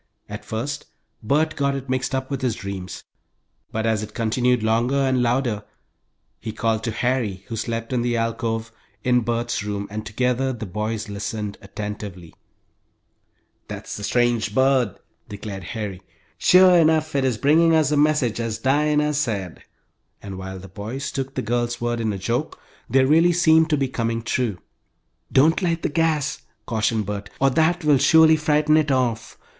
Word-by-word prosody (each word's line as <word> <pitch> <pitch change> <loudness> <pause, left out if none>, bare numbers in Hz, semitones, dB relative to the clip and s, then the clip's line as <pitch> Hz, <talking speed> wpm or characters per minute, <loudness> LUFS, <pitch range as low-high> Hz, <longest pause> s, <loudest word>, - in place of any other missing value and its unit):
At - - -7
first 130 +6 -4 0.3
Bert 155 +7 +1
got 140 -1 0
it 135 0 -6
mixed 130 +1 -1
up 130 +1 -3
with 135 -1 -2
his 125 -4 0
dreams, 95 -2 -7 0.7
but 110 0 -2
as 110 -2 +1
it 110 0 -8
continued 120 +1 +1
longer 115 +4 +1
and 130 -2 +2
louder, 120 -3 0 0.8
he 110 - -5
called 110 0 -1
to 115 - -1
Harry, 110 -5 -1
who 115 - -3
slept 115 +2 -3
in 125 - +1
the 120 0 0
alcove 115 0 -2 0.3
in 125 -1 +3
Bert's 120 0 -2
room, 100 -1 -4
and 110 +1 -4
together 125 +5 0
the 115 -2 -6
boys 105 +3 -3
listened, 105 0 -5
attentively. 100 -4 -7 1.3
"That's - - -7
the 105 - -7
strange 120 -2 +1
bird," 130 -5 +2 0.3
declared 100 -2 -7
Harry. 100 -1 -5 0.4
"Sure 185 0 +6
enough 155 -2 +2
it 135 - +2
is 130 -4 +1
bringing 160 +6 +4
us 155 -2 +3
a - - +2
message, 145 -6 +2
as 115 -2 -2
Dinah 150 +2 +2
said," 105 - -2 0.6
and 100 -1 -8
while 95 0 -6
the 95 +1 -10
boys 110 +8 -5
took 135 0 -4
the - - -2
girl's 120 +1 -1
words 120 0 -1
in 110 -1 0
a 100 - -3
joke, 120 +10 -2 0.3
they 130 0 +4
really 165 +5 +4
seemed 160 -1 +4
to 150 - +2
be 135 -1 0
coming 115 -2 -2
true. 115 -4 -1 0.7
"Don't 155 +8 +4
light 170 -2 -1
the - - +1
gas," 155 -2 0 0.2
cautioned 110 -1 0
Bert, 100 0 -5
"or 135 0 +3
that 165 +5 +2
will 145 -3 +5
surely 160 +3 +6
frighten 155 0 +2
it 155 -1 +2
off. 125 -4 -1
120 Hz, 170 wpm, -22 LUFS, 110-140 Hz, 1.3 s, Sure